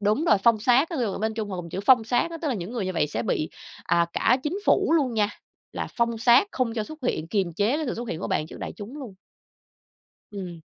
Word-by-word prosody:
đúng 210 +9 +1
rồi, 210 -11 +4
phong 230 -2 +5
sát, 250 +7 +4
ví 335 - -3
dụ 215 -5 -1
bên 220 +2 -1
Trung 215 -2 -4
họ 190 - -4
dùng 170 -1 -7
chữ 190 - -3
phong 250 -4 +6
sát 245 +8 +1
á, 330 - -6
tức 310 - 0
là 265 - 0
những 190 +1 -5
người 235 -5 -2
như 185 - -2
vậy 165 -4 +1
sẽ 150 - -3
bị, 155 - -1 0.3
à, 170 0 +2
cả - - +3
chính 325 +6 -1
phủ - - +3
luôn 260 -7 0
nha, 210 -1 +2 0.4
là - - -4
phong 235 -1 +1
sát 240 - +5
không 245 -3 -1
cho 220 -2 -1
xuất 310 +7 -10
hiện, 165 -10 -1
kiềm 190 -2 0
chế 210 - +1
cái 310 -1 -2
sự 245 - -2
xuất 240 +1 -6
hiện 160 - -4
của - - -3
bạn 155 - 0
trước - - -10
đại - - -5
chúng 225 +8 -8
luôn. 245 -9 -8 1.2
Ừm. 180 -5 -7
225 Hz, 270 wpm, -25 LUFS, 195-250 Hz, 1.2 s, phong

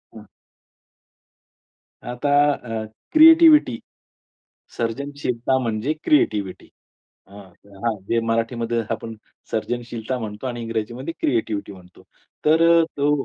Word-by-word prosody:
हं. 110 - -11 1.8
आता 125 +4 -3 0.2
अ, 115 -4 -5 0.3
क्रिएटिव्हिटी. 315 - +7 1.0
सर्जनशीलता 130 +1 -2
म्हणजे 115 +3 -2
क्रिएटिव्हिटी. 105 -10 0 0.6
अ, - - -26 0.5
हां 115 - +1
जे 115 0 +1
मराठीमध्ये 115 +1 -1
आपण 115 0 -4 0.4
सर्जनशीलता 120 +1 -3
म्हणतो 110 +1 -6
आणि 120 -2 -4
इंग्रजीमध्ये 115 +6 -4
क्रिएटिव्हिटी 110 -6 -1
म्हणतो, 90 -1 -17 0.4
तर 160 +2 +4 0.2
अ, - - +2
तो 145 0 +1
115 Hz, 95 wpm, -22 LUFS, 110-135 Hz, 1.8 s, क्रिएटिव्हिटी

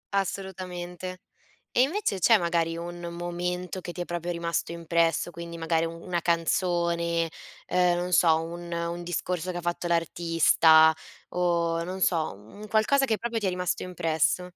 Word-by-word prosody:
Assolutamente. 185 -2 -4 0.6
E 250 - +6
invece 285 - 0
c'è 225 +4 +6
magari 170 -1 0
un 175 +1 -6
momento 180 +1 -3
che 175 - -6
ti 180 - -8
è - - -1
proprio 175 0 -3
rimasto 170 0 -2
impresso, 170 0 +1
quindi 170 0 -7
magari 165 0 +1
u 165 - -2 0.2
una 175 -1 -1
canzone, 170 0 +1 0.4
ehm, 180 -1 +2
non 180 +1 -2
so, 160 -2 +5
un 170 +1 -7
un 170 +1 -3
discorso 175 +1 -2
che 175 - -5
ha - - -4
fatto 175 0 -2
l'artista 165 -1 +5 0.4
o, 170 -2 +1
non 185 +2 -5
so, 160 - +1
mhmm, 110 - -15
un 215 - -8
qualcosa 245 +6 +3
che 220 -3 0
proprio 235 -1 -2
ti 200 - -1
è - - +3
rimasto 180 0 -2
impresso? 175 -1 0
175 Hz, 165 wpm, -27 LUFS, 170-180 Hz, 0.6 s, E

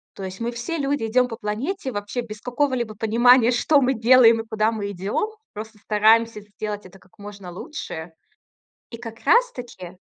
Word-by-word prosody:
То 195 - -8
есть 185 0 -7
мы 235 +1 -1
все 235 +8 -4
люди 280 -4 -1
идем 250 +3 +2
по 225 - -6
планете 255 - -3
вообще 205 +4 -3
без 215 -2 -9
какого-либо 250 -3 -1
понимания, 235 +3 +4
что 280 +4 +3
мы 265 +1 +2
делаем 230 -1 +5
и 225 - -14
куда 220 0 +1
мы 205 -2 -4
идем. 200 - -2 0.2
Просто 215 +1 -8
стараемся 220 +1 +3
сделать 205 0 -6
это 185 +1 -15
как 200 +3 -26
можно 200 -3 -9
лучше. 170 - -7 0.8
И 230 - -7
как 230 -1 -9
раз - - +4
таки 190 -8 -10
225 Hz, 180 wpm, -23 LUFS, 205-250 Hz, 0.8 s, делаем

